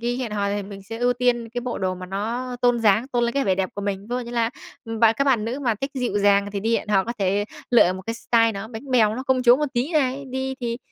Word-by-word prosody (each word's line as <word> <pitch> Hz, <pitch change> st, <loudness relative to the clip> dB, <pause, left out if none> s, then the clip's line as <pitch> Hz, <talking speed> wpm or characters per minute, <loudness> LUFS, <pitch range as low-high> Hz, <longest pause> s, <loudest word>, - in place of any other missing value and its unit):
khi 240 Hz, +1 st, -1 dB
hẹn 235 Hz, -5 st, -4 dB
hò, 200 Hz, -1 st, 0 dB
thì 205 Hz, 0 st, -2 dB
mình 195 Hz, 0 st, -9 dB
sẽ 225 Hz, +3 st, -7 dB
ưu 245 Hz, 0 st, +2 dB
tiên 245 Hz, -2 st, 0 dB
cái 245 Hz, +2 st, -4 dB
bộ 245 Hz, 0 st, -4 dB
đồ 185 Hz, -1 st, -1 dB
mà 185 Hz, 0 st, -8 dB
nó 235 Hz, +6 st, -3 dB
tôn 245 Hz, -1 st, +4 dB
dáng, 220 Hz, +4 st, +3 dB
tôn 240 Hz, -2 st, +1 dB
lên 235 Hz, -, 0 dB
cái 275 Hz, -, +1 dB
vẻ 190 Hz, -, +2 dB
đẹp 185 Hz, 0 st, -1 dB
của 205 Hz, -, -5 dB
mình. 200 Hz, -1 st, -2 dB
Ví 200 Hz, -, -15 dB
dụ 250 Hz, -, -2 dB
như 235 Hz, -, -7 dB
là 235 Hz, -1 st, 0 dB, 0.5 s
bạn 225 Hz, -1 st, +6 dB
các 275 Hz, -, +3 dB
bạn 245 Hz, -6 st, +2 dB
nữ 245 Hz, +5 st, -3 dB
mà 235 Hz, -5 st, +1 dB
thích 270 Hz, -, -2 dB
dịu 245 Hz, -6 st, -1 dB
dàng 200 Hz, 0 st, +3 dB
thì 200 Hz, -, -2 dB
đi 230 Hz, +2 st, +1 dB
hẹn -, -, -5 dB
hò 195 Hz, -2 st, +3 dB
có 235 Hz, -, -3 dB
thể 200 Hz, +1 st, +1 dB, 0.3 s
lựa 225 Hz, -7 st, +5 dB
một 190 Hz, 0 st, -7 dB
cái 230 Hz, -, -2 dB
style 230 Hz, -1 st, +2 dB
nó 200 Hz, +2 st, -6 dB
bánh 250 Hz, +4 st, -9 dB
bèo, 220 Hz, -4 st, +4 dB
nó 255 Hz, -, -4 dB
công 260 Hz, -1 st, +1 dB
chúa 245 Hz, 0 st, +7 dB
một 300 Hz, -, 0 dB
tí 255 Hz, +8 st, -1 dB
này, 275 Hz, -2 st, +1 dB
đi 265 Hz, +1 st, -3 dB
thì 235 Hz, -1 st, -3 dB
230 Hz, 300 wpm, -23 LUFS, 205-250 Hz, 0.5 s, chúa